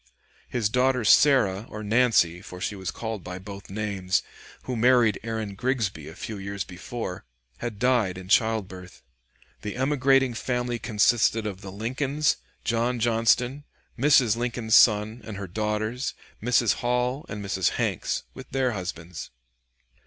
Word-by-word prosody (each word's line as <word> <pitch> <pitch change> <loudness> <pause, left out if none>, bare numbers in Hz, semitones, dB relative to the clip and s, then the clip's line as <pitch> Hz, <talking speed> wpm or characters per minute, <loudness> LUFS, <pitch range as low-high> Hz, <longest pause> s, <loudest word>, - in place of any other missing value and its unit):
His 120 -4 0
daughter 125 +1 +1
Sarah 110 -6 +4
or 105 0 -7
Nancy, 105 -6 +3
for 90 -1 -10
she 100 +2 -3
was 95 -2 -5
called 110 -5 -5
by 90 0 -6
both 100 +1 -10
names, 95 -2 -1 0.4
who 130 - -3
married 120 -2 +4
Aaron 110 -3 -4
Grigsby 105 - -2
a 80 - -10
few 105 +1 -6
years 100 0 -4
before, 95 +1 -6 0.4
had 120 -3 -4
died 115 -6 +2
in 95 -1 -9
childbirth. 95 -4 0 0.6
The 105 - -5
emigrating 135 -1 +3
family 120 0 -2
consisted 110 0 +2
of 100 -2 -5
the 95 - -8
Lincolns, 130 +8 0 0.3
John 120 +1 0
Johnston, 120 +4 +2 0.3
Mrs. 125 -4 +4
Lincoln's 115 -2 0
son, 110 +1 +5
and 105 -2 -7
her 100 - -5
daughters, 110 +5 -2 0.3
Mrs. 120 -1 +3
Hall 125 +3 0
and 105 -1 -5
Mrs. 95 -3 +1
Hanks, - - -1
with - - -11
their 130 -1 +1
husbands. 90 -4 -6
110 Hz, 140 wpm, -26 LUFS, 100-125 Hz, 0.6 s, son